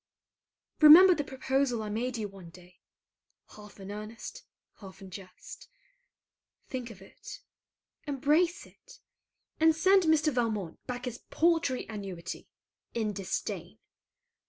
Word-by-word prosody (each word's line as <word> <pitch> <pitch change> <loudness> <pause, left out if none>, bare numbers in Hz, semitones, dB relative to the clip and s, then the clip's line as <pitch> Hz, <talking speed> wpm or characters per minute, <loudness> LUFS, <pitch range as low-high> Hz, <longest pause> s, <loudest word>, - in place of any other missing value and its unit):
Remember 335 +5 +10
the 295 - -2
proposal 265 -3 -1
I 210 - -5
made 240 +4 -2
you 215 -2 -3
one 195 -4 -13
day, 180 +1 -18 0.7
half 210 -1 -14
in 195 +1 -8
earnest 215 +2 -8 0.4
half 190 -2 -12
in 190 -2 -12
jest. 195 - -11 1.0
Think 255 -2 -5
of 210 -4 -13
it. - - -12 0.7
Embrace 300 +6 +1
it. - - -18 0.6
And 320 0 +5
send 380 +4 +4
Mr. 310 -2 +3
Valmont 215 -8 -2
back 250 0 -5
his 245 -1 -5
paltry 325 -6 +1
annuity 195 -5 -7 0.5
in 220 -3 -1
disdain. 195 -2 -5
240 Hz, 120 wpm, -29 LUFS, 200-300 Hz, 1.0 s, Remember